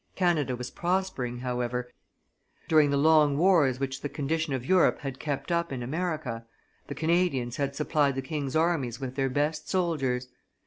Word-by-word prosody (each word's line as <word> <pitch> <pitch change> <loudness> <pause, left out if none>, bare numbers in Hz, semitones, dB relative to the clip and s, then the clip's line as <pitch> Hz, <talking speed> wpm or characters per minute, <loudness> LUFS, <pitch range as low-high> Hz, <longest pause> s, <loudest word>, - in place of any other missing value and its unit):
Canada 165 -8 +1
was 125 0 -6
prospering, 175 -9 -1
however; 125 0 -2 0.8
during 155 -2 +5
the 140 - +1
long 150 -1 +4
wars 155 -7 +4
which 135 -1 -3
the 145 - -3
condition 155 +2 -2
of 130 -2 -2
Europe 185 +3 +4
had 135 -3 -5
kept 140 0 -3
up 170 -1 0
in 125 -2 -4
America, 150 -5 -3 0.4
the - - -6
Canadians 160 -7 0
had 140 -1 -2
supplied 150 -2 +1
the 135 - -2
king's 140 0 -4
armies 155 -8 +1
with 130 -2 -5
their 135 0 0
best 145 +4 -1
soldiers. 135 -9 0
145 Hz, 165 wpm, -28 LUFS, 130-160 Hz, 0.8 s, during